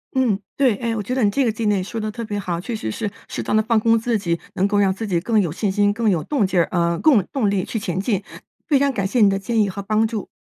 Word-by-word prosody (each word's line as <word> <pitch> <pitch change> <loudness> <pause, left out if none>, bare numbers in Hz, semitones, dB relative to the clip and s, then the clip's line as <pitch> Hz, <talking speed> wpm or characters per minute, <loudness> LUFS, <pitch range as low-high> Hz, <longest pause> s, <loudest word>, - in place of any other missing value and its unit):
嗯， 245 -7 +2 0.2
对。 260 -6 +3
哎， 230 0 -2
我 210 - -3
觉 245 - -3
得 260 -2 +1
你 205 - +4
这 265 +6 +1
个 230 - +2
建议 210 -3 0
说 225 +4 -5
得 215 - -2
特 230 +2 -6
别 205 -1 -3
好。 175 -3 -3
确 225 +6 -4
实 160 - -4
是 210 - -3 0.2
适 - - -4
当 - - -1
地 215 - +5
放 225 0 +2
空 230 +1 +3
自 230 0 0
己， 170 -4 -2 0.2
能 195 - +2
够 205 0 +1
让 195 -2 +3
自 220 +4 -5
己 180 -5 0
更 220 +5 +1
有 175 -6 0
信 195 +5 -1
心， 205 +1 +2
更 225 0 +1
有 170 -6 +1
动 265 -10 0
劲 185 -1 +1
儿， 170 - +3
呃， 170 -1 +1
供 265 -11 +4
动 240 -7 +1
力 195 -2 0
去 225 - -4
前 185 -4 -3
进。 200 -1 -1 0.4
非 285 -4 +3
常 280 0 +2
感 200 -7 -2
谢 240 +4 +1
你 205 - +7
的 195 - 0
建 225 +3 0
议 205 - +1
和 200 +1 -5
帮 215 +2 +1
助。 215 -3 -5
210 Hz, 335 characters per minute, -21 LUFS, 195-230 Hz, 0.4 s, 你